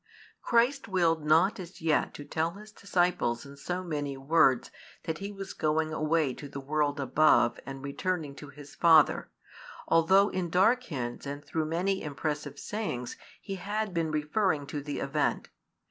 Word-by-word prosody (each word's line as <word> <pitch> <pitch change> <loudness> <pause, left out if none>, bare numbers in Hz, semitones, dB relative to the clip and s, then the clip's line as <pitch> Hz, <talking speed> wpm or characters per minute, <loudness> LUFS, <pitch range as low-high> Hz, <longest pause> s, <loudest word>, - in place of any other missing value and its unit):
Christ 245 +4 +2
willed 170 -5 +1
not 170 +8 +3
as 180 0 -9
yet 160 -2 +1
to 145 - -8
tell 165 +2 -1
His 210 +2 -12
disciples 175 - 0
in 140 0 -11
so 180 +6 -4
many 145 -5 -3
words 135 -3 +3 0.3
that 160 -1 -3
He 200 +1 -5
was 195 -1 -7
going 155 +1 0
away 155 -3 +1
to 145 - -9
the 140 - -6
world 145 +1 -1
above 140 -3 +3
and 135 0 -7
returning 150 +1 -2
to 145 - -9
His 145 0 -13
Father, 160 -3 +4 0.6
although 190 +5 +5
in 180 -2 -2
dark 225 +9 +3
hints 125 - -5
and 145 +1 -6
through 160 -1 -2
many 185 +5 0
impressive 150 -1 -4
sayings 140 - -4 0.2
He 195 -2 -6
had 205 +2 -3
been 165 -2 0
referring 155 +1 0
to 145 - -2
the 145 0 -5
event. 145 +2 -1
160 Hz, 160 wpm, -29 LUFS, 145-185 Hz, 0.6 s, although